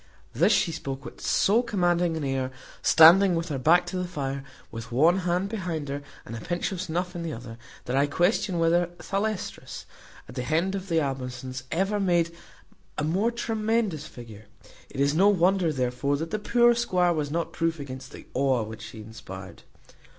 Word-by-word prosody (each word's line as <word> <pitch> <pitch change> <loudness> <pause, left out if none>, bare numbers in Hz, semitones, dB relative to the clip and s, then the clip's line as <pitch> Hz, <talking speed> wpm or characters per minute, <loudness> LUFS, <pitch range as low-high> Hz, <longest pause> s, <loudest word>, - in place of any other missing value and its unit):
This - - +3
she 170 - +3
spoke 135 -4 -6
with 120 - -10
so 215 +5 +3
commanding 175 -7 +1
an 155 - -3
air, 135 -1 -1 0.3
standing 175 +3 +7
with 165 +1 -2
her 140 -3 -2
back 175 +7 +4
to 180 +1 -4
the 180 0 -2
fire, 140 -5 -4 0.3
with 115 0 -8
one 160 +9 +4
hand 180 +1 0
behind 175 -9 -4
her, 140 +1 -3 0.2
and 115 - -7
a 115 - -7
pinch 175 +4 -2
of 185 -2 -4
snuff 180 +1 -3
in 170 - -4
the 165 -1 -3
other, 115 -1 -9 0.3
that 125 - -2
I 140 +1 +3
question 175 +4 +1
whether 170 +1 +3
Thalestris, 205 0 -4 0.4
at - - -11
the - - -3
head 160 +8 0
of 195 -1 -5
her 165 - 0
Amazons, 130 -2 -4
ever 195 +4 0
made 175 -3 +2 0.7
a - - -1
more 185 +9 +1
tremendous 220 -8 -1
figure. 110 -6 -12 0.4
It - - -8
is 140 +1 +3
no 190 +6 +5
wonder, 185 -2 +3
therefore, 130 +1 -1
that 160 +2 -5
the 215 - -1
poor 240 +3 +4
squire 180 -7 +2
was 150 -3 -2
not 165 +3 -2
proof 165 -1 -1
against 130 -2 -8
the - - -11
awe 130 -3 +2
which 110 +1 -8
she 110 0 -9
inspired. 95 -4 -10
165 Hz, 185 wpm, -26 LUFS, 135-185 Hz, 0.7 s, standing